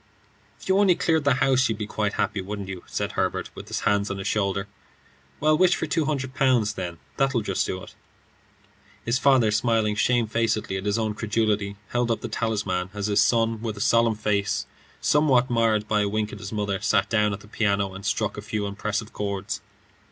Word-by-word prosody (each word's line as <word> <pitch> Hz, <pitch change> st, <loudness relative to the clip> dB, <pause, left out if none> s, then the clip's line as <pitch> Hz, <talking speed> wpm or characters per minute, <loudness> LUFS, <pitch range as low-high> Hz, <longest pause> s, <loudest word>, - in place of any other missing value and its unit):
"If -, -, -12 dB
you 190 Hz, +1 st, +3 dB
only 195 Hz, -3 st, +5 dB
cleared 160 Hz, -3 st, +1 dB
the 140 Hz, -3 st, +4 dB
house, 130 Hz, -1 st, +3 dB
you'd 110 Hz, -, -1 dB
be 105 Hz, -, -3 dB
quite 105 Hz, -1 st, -2 dB
happy, 100 Hz, -, -1 dB
wouldn't 100 Hz, +1 st, -5 dB
you?" 95 Hz, -2 st, -6 dB
said -, -, -2 dB
Herbert, -, -, -2 dB
with -, -, -10 dB
his -, -, -3 dB
hand 105 Hz, 0 st, +1 dB
on 100 Hz, -, -3 dB
his 95 Hz, -, -6 dB
shoulder. 100 Hz, -1 st, 0 dB, 0.7 s
"Well, 155 Hz, +1 st, +4 dB
wish 180 Hz, +2 st, +4 dB
for -, -, -2 dB
two 165 Hz, -3 st, 0 dB
hundred 135 Hz, -3 st, -2 dB
pounds, 125 Hz, -6 st, +2 dB
then; 90 Hz, -4 st, -5 dB, 0.2 s
that 135 Hz, -1 st, +1 dB
'll 115 Hz, -, +2 dB
just 95 Hz, -2 st, -1 dB
do 95 Hz, 0 st, -4 dB
it." -, -, -12 dB, 1.1 s
His 120 Hz, +3 st, +1 dB
father, 130 Hz, -6 st, +4 dB
smiling 110 Hz, -1 st, +2 dB
shamefacedly 115 Hz, -2 st, +1 dB
at 95 Hz, +1 st, -4 dB
his 100 Hz, +2 st, +1 dB
own 110 Hz, -2 st, -1 dB
credulity, 105 Hz, -2 st, 0 dB
held 120 Hz, 0 st, 0 dB
up 115 Hz, -, 0 dB
the -, -, -5 dB
talisman, 100 Hz, -5 st, -1 dB
as 100 Hz, -1 st, -2 dB
his 105 Hz, -1 st, +3 dB
son, 115 Hz, +1 st, +2 dB
with 110 Hz, -3 st, -4 dB
a -, -, -6 dB
solemn 115 Hz, +1 st, +3 dB
face, 105 Hz, -2 st, 0 dB, 0.4 s
somewhat 135 Hz, -4 st, +3 dB
marred 110 Hz, -2 st, +2 dB
by 105 Hz, -1 st, +2 dB
a 100 Hz, -, +1 dB
wink 110 Hz, +1 st, -2 dB
at 105 Hz, -, -8 dB
his 100 Hz, -1 st, -7 dB
mother, 105 Hz, -3 st, -2 dB
sat 95 Hz, -, +2 dB
down 105 Hz, -1 st, +2 dB
at 100 Hz, 0 st, -5 dB
the 105 Hz, -, -15 dB
piano 100 Hz, -3 st, 0 dB
and 95 Hz, +1 st, -9 dB
struck 105 Hz, +1 st, -1 dB
a -, -, -4 dB
few 105 Hz, 0 st, -3 dB
impressive 105 Hz, +2 st, -3 dB
chords. 100 Hz, -1 st, -3 dB
105 Hz, 210 wpm, -25 LUFS, 100-120 Hz, 1.1 s, only